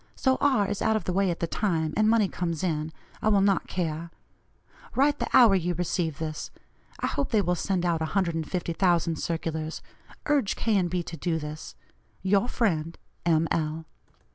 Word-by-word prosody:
So 260 Hz, -1 st, +1 dB
R. 260 Hz, -8 st, +3 dB
is 205 Hz, 0 st, -3 dB
out 220 Hz, -, +2 dB
of 215 Hz, -, -1 dB
the 180 Hz, -, -2 dB
way 195 Hz, 0 st, +2 dB
at 170 Hz, -, -3 dB
the -, -, +2 dB
time, 165 Hz, -4 st, -1 dB
and 215 Hz, 0 st, +3 dB
money 225 Hz, -3 st, +4 dB
comes 170 Hz, -2 st, -3 dB
in, 155 Hz, -3 st, -1 dB, 0.3 s
I -, -, 0 dB
will 205 Hz, -2 st, +4 dB
not 195 Hz, -1 st, +2 dB
care. 165 Hz, -2 st, -3 dB, 0.9 s
Write 285 Hz, +2 st, +3 dB
the -, -, -2 dB
hour 235 Hz, -5 st, +7 dB
you 175 Hz, -2 st, +1 dB
receive 165 Hz, -3 st, -1 dB
this. 155 Hz, -1 st, -4 dB, 0.5 s
I -, -, +1 dB
hope 280 Hz, -, -1 dB
they 220 Hz, -, +3 dB
will 180 Hz, -, +1 dB
send 180 Hz, +1 st, -1 dB
out 170 Hz, -2 st, +1 dB
150,000 170 Hz, 0 st, 0 dB
circulars. 160 Hz, -1 st, -3 dB, 0.4 s
Urge 285 Hz, -9 st, +1 dB
K. 210 Hz, -4 st, +2 dB
& -, -, 0 dB
B. 175 Hz, 0 st, -2 dB
to 165 Hz, -, -8 dB
do 165 Hz, +1 st, -1 dB
this. 155 Hz, 0 st, -7 dB, 0.5 s
"Your 195 Hz, +4 st, +3 dB
friend, 165 Hz, -10 st, -1 dB, 0.3 s
"M. 165 Hz, -1 st, +3 dB
L." 160 Hz, 0 st, -1 dB
175 Hz, 180 wpm, -27 LUFS, 160-200 Hz, 0.9 s, hour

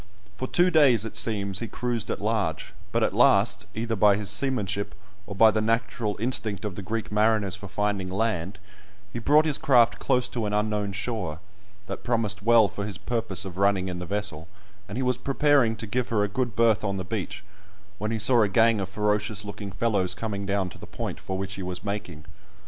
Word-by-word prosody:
For 130 Hz, +4 st, -4 dB
two 180 Hz, +5 st, +3 dB
days, 130 Hz, -, +5 dB
it 115 Hz, -, -7 dB
seems, 100 Hz, -3 st, 0 dB
he 115 Hz, -, -4 dB
cruised 120 Hz, -3 st, -2 dB
at -, -, -2 dB
large, 105 Hz, -7 st, -2 dB, 0.2 s
but -, -, +1 dB
at -, -, +1 dB
last, 100 Hz, 0 st, +3 dB
either 115 Hz, +1 st, -2 dB
by 105 Hz, -1 st, +5 dB
his 105 Hz, 0 st, -1 dB
seamanship, 105 Hz, -4 st, -1 dB, 0.3 s
or 100 Hz, -, -7 dB
by 110 Hz, +2 st, +6 dB
the 110 Hz, -, 0 dB
natural 115 Hz, -1 st, -1 dB
instinct 110 Hz, -4 st, -2 dB
of 105 Hz, -, -3 dB
the 100 Hz, -, -7 dB
Greek 110 Hz, +3 st, -4 dB
mariners 105 Hz, -2 st, +2 dB
for 100 Hz, 0 st, -9 dB
finding 100 Hz, -1 st, -2 dB
land, 95 Hz, -2 st, -2 dB, 0.6 s
he 120 Hz, -, -3 dB
brought 150 Hz, +6 st, +4 dB
his 150 Hz, -3 st, +1 dB
craft 125 Hz, -7 st, +4 dB
close 125 Hz, -1 st, +1 dB
to 115 Hz, -3 st, -2 dB
an 105 Hz, -, -3 dB
unknown 105 Hz, -1 st, 0 dB
shore, 100 Hz, -6 st, -3 dB, 0.5 s
that -, -, -7 dB
promised 110 Hz, -4 st, 0 dB
well 115 Hz, 0 st, +5 dB
for 100 Hz, -, -6 dB
his 100 Hz, -4 st, -4 dB
purpose 105 Hz, -2 st, -1 dB
of 95 Hz, -1 st, -7 dB
running 100 Hz, -1 st, +2 dB
in 90 Hz, -1 st, -5 dB
the 90 Hz, -, -6 dB
vessel; 100 Hz, -6 st, -3 dB, 0.4 s
and 105 Hz, -, -5 dB
he 130 Hz, -, -1 dB
was 125 Hz, 0 st, 0 dB
preparing 140 Hz, -4 st, +3 dB
to 110 Hz, +1 st, -5 dB
give 120 Hz, +3 st, -2 dB
her 105 Hz, -3 st, +1 dB
a -, -, +1 dB
good 120 Hz, +1 st, -2 dB
berth 115 Hz, -3 st, +3 dB
on 100 Hz, -2 st, -1 dB
the 95 Hz, -, -4 dB
beach, -, -, -4 dB, 0.6 s
when 105 Hz, +2 st, -2 dB
he 115 Hz, -, -1 dB
saw 115 Hz, +3 st, +5 dB
a 105 Hz, -, +3 dB
gang 115 Hz, +2 st, +4 dB
of 95 Hz, -, -4 dB
ferocious 105 Hz, 0 st, -1 dB
looking 100 Hz, -1 st, -7 dB
fellows 95 Hz, -2 st, 0 dB
coming 100 Hz, -3 st, -4 dB
down 100 Hz, -1 st, 0 dB
to 90 Hz, -, -11 dB
the -, -, -10 dB
point -, -, -5 dB
for 95 Hz, -, -4 dB
which 95 Hz, +1 st, -4 dB
he 100 Hz, -, -6 dB
was 90 Hz, -1 st, -5 dB
making. 90 Hz, -7 st, -5 dB
105 Hz, 210 wpm, -26 LUFS, 100-115 Hz, 0.6 s, by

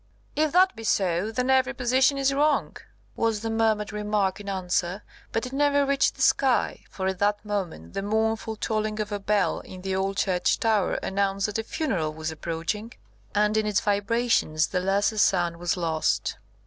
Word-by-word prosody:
"If 310 Hz, 0 st, +2 dB
that 370 Hz, -4 st, +5 dB
be 225 Hz, -, -9 dB
so, 190 Hz, -1 st, +1 dB
then 250 Hz, +3 st, 0 dB
every 265 Hz, 0 st, +2 dB
position 260 Hz, +3 st, +2 dB
is 275 Hz, 0 st, +2 dB
wrong," 290 Hz, +1 st, +1 dB, 0.4 s
was 225 Hz, -2 st, 0 dB
the 225 Hz, 0 st, -2 dB
murmured 220 Hz, -2 st, +1 dB
remark 210 Hz, -2 st, 0 dB
in 200 Hz, -1 st, -7 dB
answer; 185 Hz, 0 st, -1 dB, 0.3 s
but 225 Hz, -, -1 dB
it 250 Hz, -, -7 dB
never 285 Hz, 0 st, +3 dB
reached 280 Hz, 0 st, +2 dB
the -, -, -1 dB
sky, 265 Hz, -3 st, +2 dB
for 190 Hz, -, -5 dB
at 190 Hz, -1 st, -1 dB
that 205 Hz, +1 st, +1 dB
moment 180 Hz, -, -4 dB
the -, -, -2 dB
mournful 220 Hz, +2 st, -1 dB
tolling 215 Hz, 0 st, -2 dB
of 210 Hz, 0 st, -3 dB
a 205 Hz, -, -2 dB
bell 200 Hz, -1 st, +1 dB
in 185 Hz, -, -11 dB
the 190 Hz, 0 st, -1 dB
old 195 Hz, +1 st, -1 dB
church 185 Hz, -3 st, +1 dB
tower 215 Hz, -4 st, +1 dB
announced 195 Hz, 0 st, 0 dB
that 210 Hz, +1 st, -2 dB
a -, -, -2 dB
funeral 185 Hz, -, -2 dB
was 160 Hz, 0 st, -4 dB
approaching, 165 Hz, +8 st, -4 dB, 0.4 s
and 210 Hz, +1 st, +2 dB
in 215 Hz, -1 st, +1 dB
its 205 Hz, -2 st, +2 dB
vibrations 205 Hz, -6 st, +1 dB
the 185 Hz, -, 0 dB
lesser 200 Hz, +3 st, +1 dB
sound 175 Hz, -4 st, +2 dB
was 175 Hz, +2 st, -1 dB
lost. 155 Hz, -13 st, 0 dB
210 Hz, 185 wpm, -26 LUFS, 190-225 Hz, 0.4 s, that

